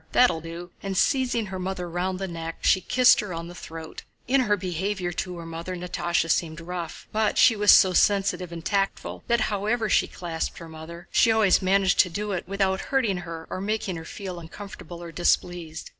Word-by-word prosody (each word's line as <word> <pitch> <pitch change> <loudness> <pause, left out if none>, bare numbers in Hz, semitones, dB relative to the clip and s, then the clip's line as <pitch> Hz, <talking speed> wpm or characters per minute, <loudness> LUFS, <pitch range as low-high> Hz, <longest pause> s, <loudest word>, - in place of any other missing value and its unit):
that'll 245 -10 +4
do!" 170 +2 -8
And 195 -1 -3
seizing 250 -1 +2
her 190 -2 -6
mother 185 -1 -3
round 180 +2 -2
the 195 +1 -3
neck, 165 -1 -6
she 190 - +4
kissed 250 +4 +5
her 205 -6 -3
on 165 0 -5
the 175 - -9
throat. 160 -1 -9 0.3
In 265 +2 +4
her 210 -4 +2
behavior 185 0 -2
to 180 +1 -4
her 170 - -8
mother 165 +2 -5
Natásha 175 -2 -1
seemed 160 -2 0
rough, 170 -1 -6
but 215 0 +1
she 230 - +6
was 210 0 +6
so 185 -1 +7
sensitive 190 -2 +2
and 165 -1 -8
tactful 195 -1 -1
that 235 -1 +2
however 215 +2 0
she - - +3
clasped 165 -2 -4
her 165 - -9
mother 165 +2 -10
she 230 - +4
always 220 -4 +4
managed 195 0 +2
to 180 - +6
do 205 +4 -3
it 180 -3 -3
without 195 0 0
hurting 240 -9 +1
her 165 -2 -7
or 185 - -3
making 205 -2 -2
her 165 - -6
feel 185 +1 -7
uncomfortable 175 0 -9
or 170 - -8
displeased. 170 -1 -1
185 Hz, 200 wpm, -25 LUFS, 170-205 Hz, 0.3 s, so